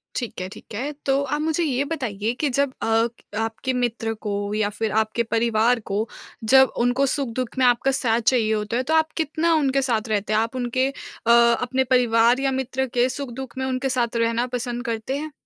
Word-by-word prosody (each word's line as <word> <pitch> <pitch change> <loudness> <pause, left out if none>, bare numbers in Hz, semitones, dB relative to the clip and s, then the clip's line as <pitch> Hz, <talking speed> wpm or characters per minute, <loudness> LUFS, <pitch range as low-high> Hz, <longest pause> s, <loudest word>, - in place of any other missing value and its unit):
ठीक 240 -6 -4
है, 185 - -3
ठीक 215 +1 -13
है। 270 +7 -3
तो 275 0 +2
आप 295 +2 -2
मुझे 320 +2 0
ये 275 -4 0
बताइए 230 -8 -2
कि 290 - +3
जब 275 +1 0
अ, - - -1
क 225 +1 +2 0.4
आपके 255 +4 -4
मित्र 235 -2 -1
को, 205 -1 -3
या 215 -1 +1
फिर 215 +1 -3
आपके 220 +2 +1
परिवार 230 +1 +2
को, 210 +1 -2 0.4
जब 265 +4 +6
उनको 245 +3 +2
सुख-दुःख 255 -3 -3
में 260 - +3
आपका 245 +2 +3
साथ 235 -3 +1
चाहिए 225 -2 +2
होता 210 +2 -1
है, 255 - 0
तो 315 +5 -1
आप 315 -1 +3
कितना 320 +1 +1
उनके 275 -3 +2
साथ 230 -4 0
रहते 210 0 0
हैं? 215 - +4
आप 230 +3 -2
उनके 255 +1 0
अ, 235 -4 -4 0.3
अपने 260 +2 +1
परिवार 240 -1 +3
या 270 0 +1
मित्र 265 0 -1
के 245 0 +3
सुख-दुःख 260 -2 -6
में 260 - -1
उनके 260 +1 -1
साथ 240 -2 0
रहना 230 +1 +1
पसंद 245 +1 -4
करते 230 +4 -2
हैं? 310 +1 -5
245 Hz, 205 wpm, -23 LUFS, 225-265 Hz, 0.4 s, जब